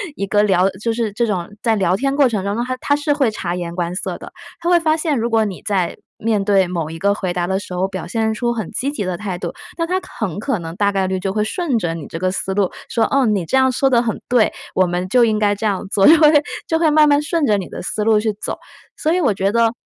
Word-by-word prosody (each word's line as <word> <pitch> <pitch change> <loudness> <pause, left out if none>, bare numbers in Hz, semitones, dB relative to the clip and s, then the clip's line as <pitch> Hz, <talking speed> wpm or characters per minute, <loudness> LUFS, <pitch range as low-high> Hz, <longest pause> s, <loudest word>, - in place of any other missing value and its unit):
一 200 - -2
个 205 +1 +3
聊 190 -2 +3
就 230 - +1
是 225 -2 -1
这 235 +3 +1
种 185 -6 -2
在 225 -2 +2
聊 185 -3 +2
天 275 +4 0
过 280 -3 +4
程 210 -5 -2
当 200 +1 -1
中， 235 - -1
它 255 0 -3
它 285 - +1
是 290 0 0
会 275 -6 +1
察 175 -4 -3
言 175 -1 -5
观 175 -1 -2
色 195 - -4
的， - - -11 0.3
它 340 - -1
会 350 -1 +5
发 315 -1 +2
现， 310 -3 0
如 230 +1 -1
果 225 -1 +3
你 195 -3 -6
在 190 -4 -1 0.2
面 215 -2 0
对 195 -2 +3
某 170 -3 -3
一 165 - -7
个 200 +2 +2
回 185 -3 -3
答 175 0 -1
的 190 +1 0
时 185 - -9
候， 180 +2 0
表 190 -1 -6
现 220 -1 0
出 240 +2 -1
很 220 -6 -5
积 275 +2 -2
极 225 -9 -4
的 180 -1 -2
态 190 -3 -4
度， - - -5 0.2
那 335 -1 -1
它 370 +2 0 0.2
很 200 -4 -2
可 225 -1 -1
能 165 0 -7
大 200 +1 +2
概 195 -1 0
率 190 0 -1
就 190 +1 -2
会 210 0 +1
顺 290 - -1
着 175 -5 -2
你 165 -4 -7
这 165 - -6
个 185 +1 0
思 190 +1 -3
路 195 -2 +1 0.2
说： 230 - +1
“哦， 275 -1 +3
你 205 -6 +1
这 215 - -1
样 260 0 +4
说 270 +2 +2
得 240 -2 +4
很 230 -3 -3
对， 245 -3 +3 0.2
我 185 - +4
们 175 +1 -2
就 245 +4 +4
应 215 -2 +1
该 205 -1 +2
这 205 - -5
样 200 -2 -1
做。” 195 -1 +3
就 325 - +8
会 305 -1 +6 0.4
就 325 - +1
会 325 -2 +3
慢 305 0 +5
慢 290 0 +4
顺 300 +1 0
着 210 -4 +3
你 190 - -4
的 - - -7
思 210 +3 -3
路 220 0 +4
去 215 0 -1
走， 205 - -5 0.4
所 315 - +1
以 365 - +2
我 270 -9 +2
觉 195 +1 0
得 230 0 +2
210 Hz, 310 characters per minute, -19 LUFS, 190-255 Hz, 0.4 s, 就